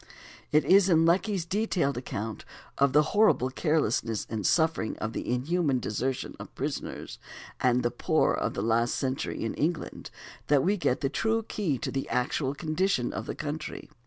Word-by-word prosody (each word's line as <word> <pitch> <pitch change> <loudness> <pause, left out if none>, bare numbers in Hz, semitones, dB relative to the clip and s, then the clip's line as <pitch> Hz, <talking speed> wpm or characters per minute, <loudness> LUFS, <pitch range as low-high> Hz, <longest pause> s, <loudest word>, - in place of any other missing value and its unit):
It 150 +1 +4
is 195 +1 +6
in 165 -2 +5
Lecky's 180 +1 +2
detailed 180 -7 0
account 110 -3 -5 0.4
of 140 -1 +4
the 150 +3 +5
horrible 205 - +4
carelessness 125 - 0
and 110 -4 -1
suffering, 160 -8 +2
and - - -11
of 110 +2 -4
the - - -3
inhuman 140 +3 +1
desertion 125 +4 -2
of - - -10
prisoners - - -5 0.4
and 125 -1 +2
the 120 - +1
poor 120 - +2
of - - -2
the - - -2
last 115 +1 +2
century 130 -3 -2
in 115 - -2
England 160 +2 -2 0.4
that 145 -2 +4
we 200 +4 +2
get 185 - 0
the 135 - +1
true 225 +8 0
key 190 -10 -1
to - - -4
the 135 - -3
actual 135 +2 0
condition 155 -3 0
of - - -5
the - - -4
country. 155 +1 -5
145 Hz, 175 wpm, -28 LUFS, 125-175 Hz, 0.4 s, is